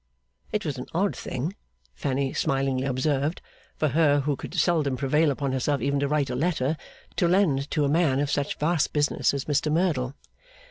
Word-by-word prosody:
It 210 - -1
was 140 -4 -3
an 125 - -6
odd 195 +3 +1
thing, 145 +10 -4 0.4
Fanny 135 - -1
smilingly 135 -1 0
observed, 140 +4 0 0.4
for 155 - +1
her 145 0 +3
who 145 +1 0
could 160 - -8
seldom 155 -6 +2
prevail 150 +4 +2
upon 140 -1 -1
herself 135 +2 0
even 140 0 0
to 140 - +1
write 145 -2 0
a - - -2
letter, 155 0 0 0.4
to 175 - +3
lend 165 -7 +2
to 150 -2 +1
a - - +2
man 145 -3 +2
of 145 0 0
such 145 0 -1
vast 155 0 +1
business 145 -1 +2
as 140 -1 -3
Mr 150 +1 +1
Merdle. 150 -6 0
145 Hz, 185 wpm, -26 LUFS, 135-155 Hz, 0.4 s, her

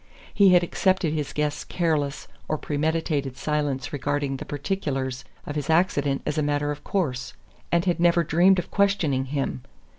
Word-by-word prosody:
He 200 -2 +6
had 175 -1 +6
accepted 185 -2 +1
his 150 -3 -2
guest's 150 0 -1
careless 150 -5 -1 0.2
or 155 - -1
premeditated 150 -3 -1
silence 145 -2 -2
regarding 145 -1 -1
the - - -7
particulars 135 -5 -3 0.2
of 145 - -5
his 145 -1 -3
accident 145 -5 +2
as 150 +1 -1
a - - +2
matter 145 0 0
of 145 - -7
course, 135 -9 -2 0.4
and 170 +1 +2
had 175 -2 +1
never 170 0 +4
dreamed 175 +5 +4
of 175 - -3
questioning 195 -10 +2
him. 135 -2 -2
150 Hz, 160 wpm, -25 LUFS, 140-170 Hz, 0.4 s, He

